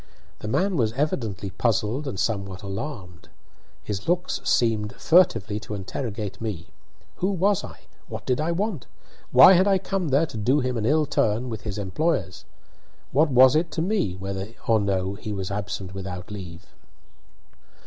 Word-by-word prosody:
The -, -, -6 dB
man 185 Hz, -, +1 dB
was 110 Hz, -4 st, +1 dB
evidently 115 Hz, -, -2 dB
puzzled 115 Hz, +6 st, 0 dB
and 100 Hz, -8 st, -4 dB
somewhat 100 Hz, -2 st, -2 dB
alarmed. 100 Hz, -, -7 dB, 0.5 s
His 105 Hz, -1 st, -5 dB
looks 175 Hz, +1 st, 0 dB
seemed 110 Hz, -3 st, +1 dB
furtively 115 Hz, -, +3 dB
to 110 Hz, -1 st, -6 dB
interrogate 105 Hz, 0 st, -5 dB
me. 100 Hz, -7 st, -5 dB, 0.5 s
Who 185 Hz, -, 0 dB
was 195 Hz, +1 st, +1 dB
I? -, -, -10 dB, 0.3 s
What -, -, -7 dB
did 130 Hz, +2 st, +1 dB
I 160 Hz, +2 st, 0 dB
want? 185 Hz, -, -2 dB, 0.4 s
Why 190 Hz, -, +9 dB
had 185 Hz, +2 st, +4 dB
I 195 Hz, -1 st, +4 dB
come 190 Hz, -1 st, -2 dB
there 140 Hz, +3 st, +3 dB
to 120 Hz, -, -8 dB
do 125 Hz, +7 st, +2 dB
him 125 Hz, -2 st, -1 dB
an 110 Hz, -1 st, -1 dB
ill 155 Hz, +2 st, +3 dB
turn 115 Hz, -1 st, 0 dB
with 110 Hz, -3 st, -5 dB
his 105 Hz, -2 st, -5 dB
employers? 100 Hz, -, -1 dB, 0.7 s
What 150 Hz, +4 st, +3 dB
was 130 Hz, +1 st, +6 dB
it 165 Hz, +2 st, +2 dB
to 160 Hz, -, -1 dB
me 185 Hz, -, 0 dB
whether 95 Hz, +1 st, -5 dB, 0.2 s
or 115 Hz, -1 st, +3 dB
no 95 Hz, -2 st, 0 dB
he 105 Hz, +1 st, -7 dB
was 95 Hz, -1 st, -4 dB
absent 100 Hz, -2 st, -4 dB
without 95 Hz, -1 st, -6 dB
leave? 90 Hz, -4 st, -9 dB
110 Hz, 165 wpm, -25 LUFS, 100-150 Hz, 0.7 s, Why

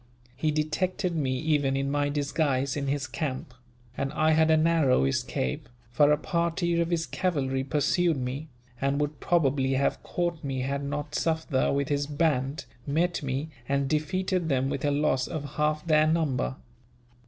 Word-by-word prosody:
He 155 Hz, +4 st, 0 dB
detected 170 Hz, +4 st, -1 dB
me, 130 Hz, -4 st, 0 dB
even 145 Hz, -1 st, +1 dB
in 135 Hz, 0 st, -1 dB
my 145 Hz, 0 st, +1 dB
disguise 140 Hz, -2 st, 0 dB
in 140 Hz, -1 st, -2 dB
his 140 Hz, 0 st, -1 dB
camp; 130 Hz, -2 st, -4 dB, 0.4 s
and 135 Hz, -, -2 dB
I 155 Hz, 0 st, +3 dB
had 160 Hz, 0 st, +4 dB
a 160 Hz, -, +5 dB
narrow 155 Hz, -, +3 dB
escape, 65 Hz, -1 st, -2 dB, 0.2 s
for 145 Hz, +5 st, +4 dB
a 150 Hz, -, +4 dB
party 170 Hz, +1 st, 0 dB
of 170 Hz, -, 0 dB
his 165 Hz, -2 st, 0 dB
cavalry 135 Hz, -3 st, -1 dB
pursued 150 Hz, +4 st, +1 dB
me, 135 Hz, +4 st, -4 dB, 0.3 s
and 140 Hz, +1 st, +1 dB
would 150 Hz, 0 st, -2 dB
probably 135 Hz, -5 st, +2 dB
have 135 Hz, +1 st, +1 dB
caught 175 Hz, -3 st, -2 dB
me 135 Hz, -2 st, -2 dB
had 140 Hz, +2 st, -2 dB
not 145 Hz, +1 st, -4 dB
Sufder, 160 Hz, -4 st, 0 dB
with 140 Hz, -1 st, 0 dB
his 145 Hz, -1 st, 0 dB
band, 145 Hz, -3 st, 0 dB, 0.2 s
met 170 Hz, +5 st, +1 dB
me, 140 Hz, +2 st, -3 dB, 0.2 s
and 140 Hz, 0 st, +1 dB
defeated 175 Hz, +4 st, 0 dB
them 135 Hz, -1 st, +1 dB
with 135 Hz, -, -3 dB
a -, -, +3 dB
loss 145 Hz, -3 st, +1 dB
of 145 Hz, -3 st, -5 dB
half 150 Hz, +1 st, +1 dB
their 155 Hz, -1 st, +4 dB
number. 145 Hz, -, 0 dB
145 Hz, 165 wpm, -27 LUFS, 135-160 Hz, 0.4 s, a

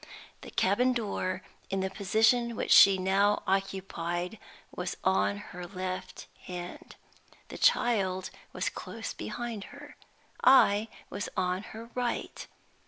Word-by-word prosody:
The -, -, -9 dB
cabin 245 Hz, +7 st, +2 dB
door, 190 Hz, -5 st, -2 dB, 0.3 s
in 195 Hz, 0 st, -1 dB
the 190 Hz, 0 st, -2 dB
position 225 Hz, +4 st, +2 dB
which -, -, -2 dB
she 195 Hz, -1 st, +9 dB
now 195 Hz, +2 st, +2 dB
occupied, 190 Hz, -1 st, -2 dB, 0.4 s
was -, -, -4 dB
on 100 Hz, +1 st, +2 dB, 0.2 s
her 180 Hz, 0 st, -7 dB
left 185 Hz, 0 st, -5 dB, 0.2 s
hand. 175 Hz, -1 st, -7 dB, 0.5 s
The -, -, -8 dB
child 190 Hz, -6 st, +2 dB, 0.2 s
was -, -, -2 dB
close -, -, -6 dB
behind 235 Hz, -4 st, -5 dB
her. 290 Hz, +1 st, -12 dB, 0.5 s
I 225 Hz, -5 st, +6 dB, 0.2 s
was 205 Hz, -, -4 dB
on 185 Hz, 0 st, 0 dB
her 230 Hz, +2 st, -10 dB
right. 245 Hz, -1 st, -3 dB
195 Hz, 120 wpm, -29 LUFS, 185-225 Hz, 0.5 s, she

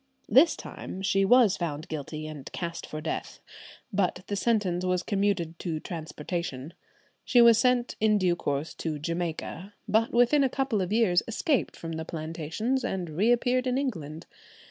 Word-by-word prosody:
This 290 Hz, +7 st, +6 dB
time 190 Hz, -, -8 dB
she 195 Hz, 0 st, +2 dB
was 230 Hz, -1 st, +5 dB
found 160 Hz, -1 st, -4 dB
guilty 155 Hz, 0 st, -5 dB
and 155 Hz, -3 st, -8 dB
cast 170 Hz, -1 st, -5 dB
for 155 Hz, -, -6 dB
death, 160 Hz, -, -4 dB, 0.5 s
but 185 Hz, -2 st, 0 dB
the 205 Hz, -, -3 dB
sentence 200 Hz, -5 st, +1 dB
was 180 Hz, -1 st, 0 dB
commuted 195 Hz, -5 st, -1 dB
to 165 Hz, -4 st, -3 dB
transportation. 155 Hz, -2 st, -5 dB, 0.5 s
She 245 Hz, -, +3 dB
was 235 Hz, -1 st, +7 dB
sent 250 Hz, -1 st, +2 dB
in 215 Hz, -1 st, +4 dB
due 180 Hz, -3 st, +2 dB
course 145 Hz, -1 st, -2 dB
to 155 Hz, -2 st, -3 dB
Jamaica, 170 Hz, +4 st, -4 dB
but 220 Hz, +2 st, +2 dB
within 245 Hz, +5 st, +4 dB
a 265 Hz, -, +2 dB
couple 265 Hz, -6 st, 0 dB
of 185 Hz, +1 st, -3 dB
years 210 Hz, -6 st, +3 dB
escaped 255 Hz, +4 st, 0 dB
from 165 Hz, -, -7 dB
the 160 Hz, 0 st, -4 dB
plantations, 165 Hz, -, -3 dB
and 180 Hz, -4 st, -3 dB
reappeared 245 Hz, +8 st, +2 dB
in 255 Hz, 0 st, +1 dB
England. 165 Hz, -, -4 dB
185 Hz, 160 wpm, -28 LUFS, 160-230 Hz, 0.5 s, was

